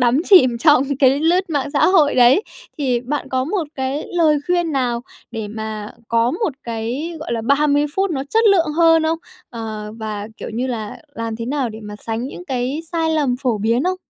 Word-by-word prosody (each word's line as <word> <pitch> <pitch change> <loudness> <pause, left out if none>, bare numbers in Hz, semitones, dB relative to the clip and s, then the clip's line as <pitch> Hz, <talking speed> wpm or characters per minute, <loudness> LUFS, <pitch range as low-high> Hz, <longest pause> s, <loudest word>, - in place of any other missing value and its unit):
đắm 245 +1 +3
chìm 255 -12 +6
trong 295 0 +5 0.2
cái 270 +1 +4
lướt 350 +3 +2
mạng 285 -2 -1
xã 285 - +3
hội 325 -6 +4
đấy 250 - +5 0.4
thì 255 -4 0
bạn 280 +4 -4
có 260 0 0
một 350 +3 -1
cái 265 +2 -2
lời 315 -3 +4
khuyên 350 -2 +1
nào 245 -4 0 0.3
để 220 -3 -5
mà 215 -1 -6 0.2
có 230 +1 +2
một 350 - -1
cái, 235 +8 -4
gọi 305 - -4
là, 230 -1 -2
30 290 +2 +3
phút 390 0 +1
nó 275 -5 -2
chất 450 +1 +3
lượng 390 -6 +5
hơn 330 -1 +5
không? 320 +1 0 0.3
Ờ, 215 -2 -6
và, 215 -2 -5
kiểu, - - -7
như 245 +3 -1
là 220 -5 -4 0.2
làm 230 -1 -4
thế 230 - -4
nào 270 -1 -1
để 220 -1 -9
mà 210 0 -8
sánh 225 +1 -2
những 355 - -9
cái 260 0 -2
sai 325 -1 0
lầm 290 -6 +1
phổ 245 -5 0
biến 230 +5 +1
không? 370 +1 0
265 Hz, 210 wpm, -19 LUFS, 230-320 Hz, 0.4 s, chìm